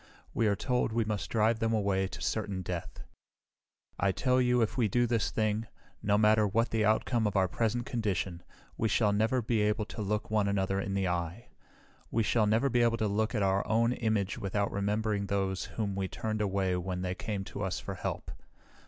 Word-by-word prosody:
We 115 - +2
are 100 - +2
told 125 +3 0
we 115 0 +1
must 105 -5 -3
drive 110 0 +2
them 115 0 +1
away 100 -3 +1
to - - -8
certain 100 -4 -2
death. 90 -2 -5 1.0
"I 100 0 +3
tell 130 +5 +2
you 125 -1 +3
if 110 - -2
we 120 -3 +2
do 120 +4 +2
this 115 -2 +1
thing, 110 0 -1 0.3
no 105 0 +2
matter 105 0 +4
what 115 +4 +1
the 110 -1 +1
outcome 110 +1 +2
of 105 - -3
our 95 -1 +3
present 115 +5 -1
condition, 95 -6 -2 0.4
we 110 - +1
shall 105 0 +2
never 110 +4 +1
be 110 0 +1
able 105 +1 +1
to 110 - -7
look 105 +1 -2
one 105 -2 +2
another 95 -1 0
in 100 0 -2
the 95 -1 +1
eye. 90 +6 -3 0.6
We 115 - +1
shall 110 0 +2
never 110 +6 +3
be 120 -2 +2
able 115 -1 +3
to 110 - 0
look 110 +4 0
at 105 - +1
our 95 0 +2
own 115 +2 +2
image 110 -5 -1
without 100 +1 -1
remembering 105 0 -1
those 95 -1 -1
whom 100 0 -3
we 95 -1 -1
turned 110 +2 -3
away 95 -2 0
when 90 0 -3
they 90 0 -1
came 100 +1 -4
to 100 - -7
us 95 -3 -1
for 100 - -6
help. 90 - -4
105 Hz, 205 wpm, -30 LUFS, 95-115 Hz, 1.0 s, matter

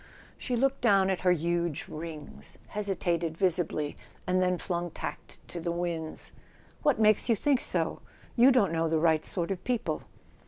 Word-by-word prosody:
She 250 - -3
looked 270 +3 +1
down 195 -5 +4
at 185 - -2
her 180 - +4
huge 170 -1 0
rings, 155 -1 -8
hesitated 175 -5 -1
visibly, 170 -5 0 0.3
and 185 0 +2
then 180 0 +2
flung 175 -1 -2
tact - - -7
to 175 - -5
the 170 +1 -2
winds. 170 -2 -3 0.5
"What 290 -6 +2
makes 215 +2 +4
you 230 - +5
think 275 +3 +2
so? - - -1 0.4
You 250 +3 +7
don't 230 -9 +3
know 165 0 +1
the 160 - +2
right 160 -1 +3
sort 175 -1 -2
of 185 -1 -4
people." 245 -3 -1
180 Hz, 165 wpm, -29 LUFS, 165-210 Hz, 0.5 s, You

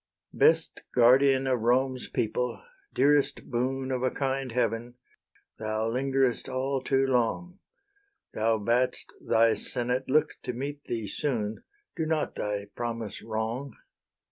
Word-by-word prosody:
Best - - +3
guardian 130 +2 +5
of 130 -2 +1
Rome's 130 +3 +1
people, 125 +3 -2 0.3
dearest 145 0 +2
boon 130 +2 -1
Of 130 -1 -1
a 130 - +2
kind 135 -1 -2
Heaven, 115 0 -1 0.6
thou 110 +1 -1
lingerest 135 0 0
all 130 +1 -1
too 135 +1 +2
long: 135 - 0 0.7
Thou 110 +1 +1
bad'st 120 +4 0
thy 115 0 +4
senate 125 +2 -1
look 150 +3 +4
to 125 - -4
meet 140 +4 -5
thee 115 -2 -3
soon: 110 -2 -2 0.3
Do 160 -2 -2
not 160 -1 0
thy 105 -1 -3
promise 115 -3 -4
wrong. 115 +5 -4
125 Hz, 125 wpm, -28 LUFS, 115-135 Hz, 0.7 s, guardian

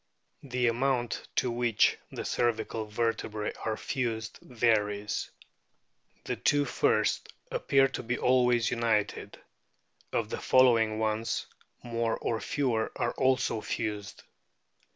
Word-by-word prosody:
The 125 -2 -1
amount 120 0 0
to 125 - +1
which 120 -2 +3 0.2
the - - -5
cervical 110 -2 -1
vertebrae 110 -1 -2
are 110 -1 -1
fused 115 -4 -3
varies. 105 -3 0 0.9
The - - -3
two 145 0 +2
first - - +1 0.2
appear 135 -1 +3
to 130 - -5
be 120 +1 -2
always 125 -2 +3
united; 115 -3 -1 0.7
of - - -1
the - - -3
following 115 -4 +4
ones, 110 +1 -1 0.4
more 115 -1 -1
or 115 - -2
fewer 110 - 0
are - - 0
also 130 -4 +1
fused. 105 -3 -4
115 Hz, 110 wpm, -29 LUFS, 110-125 Hz, 0.9 s, following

